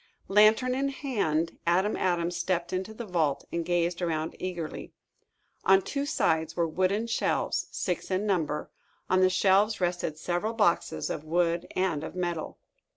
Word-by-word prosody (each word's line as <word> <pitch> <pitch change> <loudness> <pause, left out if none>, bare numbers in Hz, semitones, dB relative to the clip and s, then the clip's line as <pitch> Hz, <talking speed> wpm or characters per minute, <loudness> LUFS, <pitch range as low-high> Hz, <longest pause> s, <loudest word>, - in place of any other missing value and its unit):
Lantern 215 +5 +5
in 275 +2 0
hand, 200 - -1
Adam 185 +5 +2
Adams 175 -1 0
stepped 175 0 -1
into 190 +3 -2
the 225 +2 -7
vault 165 -7 0
and 170 0 -1
gazed 175 +1 0
around 160 -2 -2
eagerly. 175 -4 -5 0.7
On 195 0 +6
two 280 +8 -3
sides 160 - +1
were 170 -1 +1
wooden 185 +7 0
shelves, 230 - 0
six 180 -3 -3
in 190 +2 0
number. 165 -7 -1 0.4
On 185 0 +4
the 185 - +5
shelves 195 +3 +3
rested 175 -3 -1
several 175 +7 -2
boxes, 210 -7 +1
of 150 - -4
wood 170 +1 0
and 180 -5 0
of 160 - -7
metal. 175 -3 -3
180 Hz, 155 wpm, -28 LUFS, 170-200 Hz, 0.7 s, On